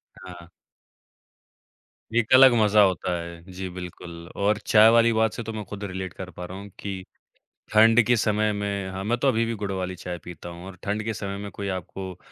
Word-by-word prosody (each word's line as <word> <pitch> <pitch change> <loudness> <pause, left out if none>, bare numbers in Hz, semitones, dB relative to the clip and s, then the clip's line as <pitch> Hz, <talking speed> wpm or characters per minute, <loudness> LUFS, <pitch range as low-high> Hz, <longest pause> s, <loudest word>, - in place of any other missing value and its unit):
हाँ। 85 -2 -12 1.6
ये 120 - +4
एक 120 - -4
अलग 130 0 +9
मज़ा 105 0 +5
होता 95 -2 +1
है। 85 0 -9
जी, 95 +1 -5
बिल्कुल, 90 -2 -9
और 105 +1 +1
चाय 110 0 +7
वाली 115 0 +5
बात 110 -1 +2
से - - -5
तो 115 0 -6
मैं 110 -1 -5
खुद 100 +2 -7
रिलेट 95 -2 -5
कर 95 -1 -8
पा 90 +1 -8
रहा 90 +2 -7
हूँ 100 +1 -9
कि 95 -2 -5 0.7
ठंड 110 +2 +7
के 120 - +4
समय 110 -1 +1
में 100 -2 -3
हाँ, 95 +1 -5
मैं 115 +4 0
तो 130 - 0
अभी 115 -3 +2
भी 115 - -2
गुड़ 100 -2 -4
वाली 95 -1 -3
चाय 90 0 -6
पीता 85 0 -9
हूँ, 85 +1 -10
और 95 -1 -9
ठंड 105 +1 -2
के 110 +1 -2
समय 100 -2 -5
में 100 0 -6
कोई 100 - -5
आपको 95 0 -6
100 Hz, 215 wpm, -25 LUFS, 90-110 Hz, 1.6 s, अलग